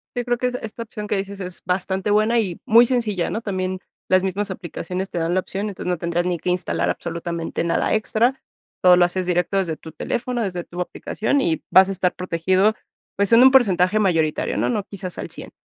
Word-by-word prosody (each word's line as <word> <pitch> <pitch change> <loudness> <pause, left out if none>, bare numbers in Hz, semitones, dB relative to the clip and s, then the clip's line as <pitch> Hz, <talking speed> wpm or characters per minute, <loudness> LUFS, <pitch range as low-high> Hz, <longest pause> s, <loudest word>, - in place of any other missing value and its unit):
Yo 245 - -1
creo 245 -1 0
que 250 - 0
es 250 - -3
esta 225 +1 -6
opción 210 -1 -7
que - - 0
dices 200 0 -5
es 180 -2 -6
bastante 190 +2 -1
buena 215 +3 +3
y 185 -6 -2
muy 235 0 +7
sencilla, 225 -8 0
¿no? 225 - -3
También 185 -3 -3 0.3
las 185 0 +4
mismas 195 +2 -2
aplicaciones 185 +1 -5
te 175 - -3
dan 165 +2 0
la 185 - +3
opción, 200 +3 -4
entonces 185 - -5
no 180 - 0
tendrás 170 +1 -1
ni 180 -2 -1
que 180 - -3
instalar 180 0 0
absolutamente 170 0 -3
nada 170 - 0
extra. 225 +4 +1 0.4
Todo 180 -1 +7
lo 175 0 +5
haces 185 +1 -2
directo 180 +2 0
desde 170 -5 0
tu 160 - -11
teléfono, 240 +9 -3
desde 180 -3 -3
tu 175 - -10
aplicación, 220 +9 -1
y 165 -7 0
vas 190 +1 +7
a - - -1
estar 185 -1 0
protegido, 185 +4 +1 0.4
pues 200 +3 +1
en 230 - +8
un 265 - +8
porcentaje 205 -5 +4
mayoritario, 165 -6 +1
¿no? - - +1
No 215 -4 -1
quizás 190 -3 -7
al - - -5
100. - - -9
190 Hz, 220 wpm, -22 LUFS, 180-215 Hz, 0.4 s, en